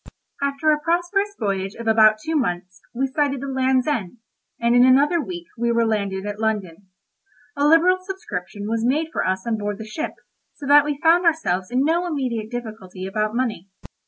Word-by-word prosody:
After 280 +2 +1
a 300 - +2
prosperous 355 +6 0
voyage 195 -2 -2
of 230 - -8
about 215 -1 +5
two 315 +9 -4
months, 185 - -2
we 260 +3 -1
sighted 280 0 -1
the 275 - -6
Land's 260 -1 +1
End, 230 - -2 0.4
and 235 +1 +2
in 245 - +7
another 280 +6 +4
week 345 +1 -7
we 235 0 +1
were 235 0 +2
landed 200 -3 -1
at 205 0 -5
London. 205 -4 -3 0.7
A 285 +1 +2
liberal 345 +4 +5
subscription 370 - -6
was 225 0 -1
made 300 +7 +1
for - - 0
us 190 0 -1
on 225 -2 -1
board 205 -1 -3
the 220 - -8
ship, 305 +9 -5 0.4
so 290 - -9
that 290 +1 +6
we 295 -1 -2
found 340 +2 +5
ourselves 190 - 0
in 255 +3 +1
no 340 +3 +1
immediate 250 -9 -3
difficulty 215 -6 -7
about 215 +3 -2
money. 220 -7 -2
245 Hz, 190 wpm, -22 LUFS, 210-300 Hz, 0.7 s, in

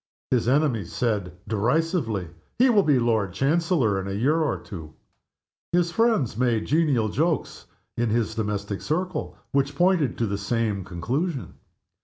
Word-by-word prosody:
His 125 -3 +2
enemies 130 - +1
said, 105 -7 -1
derisively, 115 - 0 0.3
"He 255 +1 +5
will 210 -3 +5
be 150 -7 +3
Lord 110 -6 +1
Chancellor 140 - +1
in 95 - -6
a 95 - -3
year 150 +9 +2
or 155 - 0
two!" 80 -6 -10 0.8
His 175 -1 +2
friends 225 - +2
made 120 -2 +1
genial 145 -8 +2
jokes 160 +8 -1 0.3
in 120 -1 0
his 110 0 0
domestic 105 -2 -3
circle, 180 +4 -2
which 140 +1 +1
pointed 175 -5 +2
to 115 - +1
the 100 -1 -2
same 110 -5 -1
conclusion. 130 - -3
125 Hz, 145 wpm, -25 LUFS, 105-160 Hz, 0.8 s, He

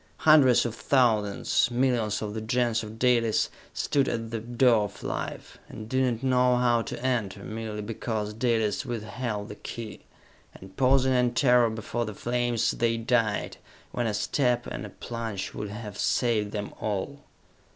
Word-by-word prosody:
Hundreds 145 -7 +6
of 120 - -2
thousands, 115 -3 +2
millions 120 -4 0
of 105 -1 -4
the 110 - -4
Gens 120 0 +1
of 110 0 -8
Dalis, 115 -2 +2 0.2
stood 140 -2 0
at 115 -1 -3
the 115 - -2
door 120 -1 +3
of 100 - -10
life, - - -5
and 110 0 -8
did 125 -1 0
not - - +1
know 125 -1 +3
how 120 -1 +3
to - - -6
enter, 105 -6 -1
merely 110 0 -5
because 105 -1 -3
Dalis 115 -2 0
withheld 115 -3 -4
the 105 - -7
key! 115 +1 -7 0.6
And, 95 0 -13
pausing 130 0 +3
in 125 -1 +2
terror 125 -3 +4
before 110 +2 -3
the 105 -2 -6
flames, 120 0 0
they 115 -1 0
died, 115 -2 0 0.3
when 120 -1 -1
a 105 - -1
step 125 0 +1
and - - -5
a - - -11
plunge 115 -5 -5
would 105 - -5
have 105 -1 -7
saved 110 -4 +1
them 105 -1 -5
all! 110 +7 -3
115 Hz, 160 wpm, -27 LUFS, 105-125 Hz, 0.6 s, Hundreds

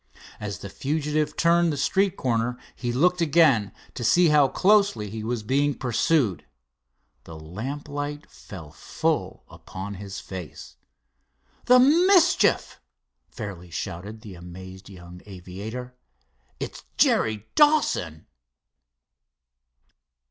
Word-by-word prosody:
As 105 -1 -5
the - - -8
fugitive 150 +4 -2
turned 170 0 +3
the 145 - -3
street 190 +7 +1
corner 120 0 -1 0.2
he 120 -1 -3
looked 175 +8 +2
again 145 - +3 0.2
to 120 - -6
see 170 +8 +4
how 150 -2 +5
closely 195 - +2
he 110 0 -6
was 115 -1 -3
being 140 +5 +1
pursued. 125 - 0 0.8
The 80 - -10
lamp 110 - -6
light 145 +1 -5
fell 80 -7 -11
full 75 - -3
upon 95 +2 -8
his 100 0 -7
face. 90 -6 -9 0.9
"The 250 +1 +7
mischief!" 350 +6 +4 0.5
fairly 90 -4 -8
shouted 95 +6 -6
the 105 -4 -10
amazed 95 +2 -11
young 90 -2 -12
aviator. 105 +7 -8 0.6
"It's - - -6
Jerry 110 -1 +2
Dawson!" 295 - +2
120 Hz, 110 wpm, -25 LUFS, 95-155 Hz, 0.9 s, The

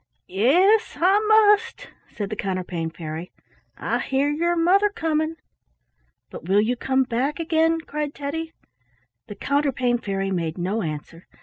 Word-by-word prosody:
"Yes, 350 - +3
I 380 +4 +4
must," 435 +1 +3 0.2
said 205 -1 -6
the - - -2
Counterpane 180 -4 -3
Fairy. 160 +1 -7 0.5
"I - - -1
hear 275 +2 0
your 340 +3 0
mother 375 +5 +3
coming." 320 -4 -1 1.0
"But - - -9
will 200 +2 +4
you 235 +4 0
come 265 +2 +1
back 260 +5 -2
again?" 325 0 +1
cried 300 -1 -4
Teddy. 320 +3 -4 0.8
The 205 - -8
Counterpane 255 -1 0
Fairy 195 -2 -3
made 170 -3 -2
no 190 +5 -1
answer. 160 +1 -7
270 Hz, 135 wpm, -23 LUFS, -, 1.0 s, I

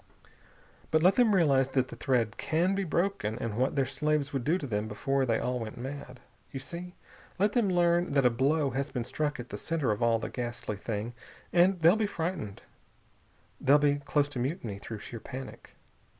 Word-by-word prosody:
But 155 0 +2
let 185 +2 +6
them 235 -5 +4
realize 135 -7 +4
that 130 -1 +1
the - - -8
thread 115 -4 0
can 170 +4 +1
be 195 0 0
broken, 170 - -1
and 115 -3 -3
what 130 +5 +1
their 135 -2 +2
slaves 145 +2 -1
would 135 -3 -1
do 160 +8 +2
to 180 - -5
them 105 -4 -2
before 135 +5 0
they 115 -1 +2
all 125 0 -1
went 110 -2 -6
mad.... 130 0 -7 0.3
You 135 - -5
see? 175 +6 -7 0.4
Let 205 +3 +3
them 230 -5 +2
learn 175 -2 +2
that 140 -2 +3
a 125 - +6
blow 140 +4 +1
has 135 +3 -2
been 125 -4 -3
struck 145 +3 -2
at 120 - -7
the - - -6
center 160 -8 0
of 105 - -2
all 115 -1 +4
the 115 - -4
ghastly 120 -4 -4
thing, 110 +3 -4 0.4
and 180 +1 +4
they'll 170 +4 +7
be 220 -1 +1
frightened. 160 - -4 1.0
They'll 140 +2 +5
be 145 -1 +3
close 145 0 +1
to 135 - -5
mutiny 120 - -3
through 110 0 -7
sheer 115 - -7
panic. 130 +3 -9
135 Hz, 200 wpm, -29 LUFS, 120-165 Hz, 1.0 s, they'll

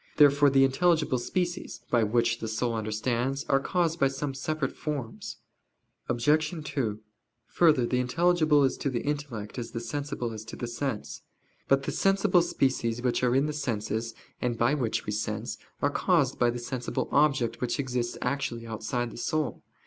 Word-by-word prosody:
Therefore 145 -1 +6
the 135 0 +5
intelligible 150 -1 +2
species, 175 +5 -3
by 120 - +4
which 115 +2 +1
the 115 - -4
soul 115 +2 -1
understands, 115 +5 -1
are 135 - +4
caused 170 +2 0
by 135 - +5
some 135 +1 -3
separate 155 +3 -2
forms. 140 -7 -5 0.7
Obj. 150 +6 +2 0.2
2: 110 -8 -2 0.5
Further, 155 -8 +3
the 125 +1 0
intelligible 155 +2 +3
is 135 - +1
to 140 - -1
the 125 -3 -2
intellect, 140 -7 -4
as 115 - -5
the 115 - -2
sensible 125 0 -4
is 110 -1 -7
to 115 - -8
the - - -4
sense. 115 - -4 0.5
But 135 0 +3
the - - -2
sensible 195 -2 +3
species 120 -6 0
which 125 0 +1
are 125 0 +3
in 135 +2 +3
the 150 - -2
senses, 115 -4 -2 0.3
and 120 -2 -1
by 120 +5 +3
which 125 -7 -1
we - - -2
sense, 110 +1 -3 0.2
are 145 - +3
caused 150 -5 +2
by 120 - +4
the 120 - -2
sensible 125 0 -3
object 130 -6 +2
which 125 +4 -1
exists 125 -3 -2
actually 125 -3 -2
outside 115 +2 -3
the - - -10
soul. 155 +3 -1
130 Hz, 170 wpm, -28 LUFS, 115-145 Hz, 0.7 s, Therefore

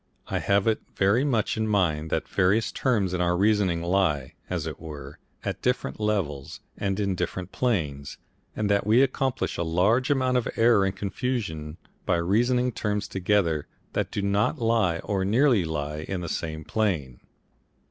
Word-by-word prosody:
I - - 0
have 100 0 +2
it 110 -1 +1
very 100 +7 +3
much 120 -7 0
in 110 0 0
mind 85 -7 +1
that - - -1
various 100 +5 +2
terms 105 -8 0
in 90 - 0
our 90 0 +2
reasoning 100 -4 +2
lie, 85 -7 +1 0.2
as - - -2
it - - -6
were, 75 -3 -9 0.3
at - - -3
different 65 - -1
levels 95 -11 -2 0.2
and 100 0 -2
in 100 -2 0
different 90 +1 -4
planes, 75 - -1 0.4
and 110 - -1
that 100 0 +1
we 115 +5 +6
accomplish 135 -1 -1
a 85 - 0
large 100 +10 +2
amount 130 -3 +2
of 125 - 0
error 115 -4 +4
and 95 0 -1
confusion 95 - -3 0.3
by - - +3
reasoning 120 +9 +2
terms 105 -2 -2
together 90 -5 +1 0.3
that - - -1
do 100 - -3
not 100 +9 +1
lie 115 -8 +2
or 100 -3 -1
nearly 115 +1 +3
lie 75 -1 -3
in 95 -2 -3
the 85 - -4
same 80 -1 -4
plane. 80 - -1
100 Hz, 170 wpm, -26 LUFS, 85-110 Hz, 0.4 s, we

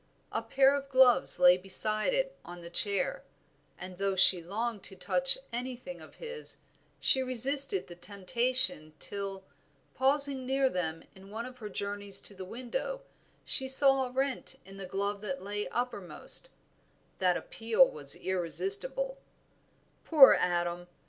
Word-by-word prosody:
A - - -3
pair 270 0 +2
of 280 -1 -5
gloves 255 -2 +4
lay 180 0 +5
beside 215 - 0
it - - -2
on 175 0 -11
the 170 0 -11
chair, 205 - 0 0.5
and 180 0 -10
though 195 -1 -1
she 185 -1 +8
longed 210 +5 -5
to 190 - -10
touch 265 +9 +1 0.2
anything 250 +2 -7
of - - -15
his, 475 -1 -1 0.4
she 265 - +2
resisted 270 - +3
the 175 - -12
temptation 200 -3 +1
till, 195 0 -6 0.5
pausing 275 0 0
near 265 +1 0
them 165 -3 -4
in 190 +1 -16
one 225 +3 -6
of 250 0 -12
her 210 -2 -8
journeys 200 0 -1
to - - -8
the 190 -1 -10
window, 255 - -6 0.4
she 265 - +2
saw 270 0 +6
a - - -12
rent 265 0 -3
in 195 +1 -13
the 195 -1 -8
glove 200 +2 -4
that 185 -3 -6
lay 205 +1 -5
uppermost, 245 - -5 0.7
that 180 -2 +1
appeal 230 +3 +1
was 140 -2 -1
irresistible, 405 - -1 0.8
"Poor 295 -5 +7
Adam! 175 0 -2
220 Hz, 145 wpm, -29 LUFS, 190-270 Hz, 0.8 s, she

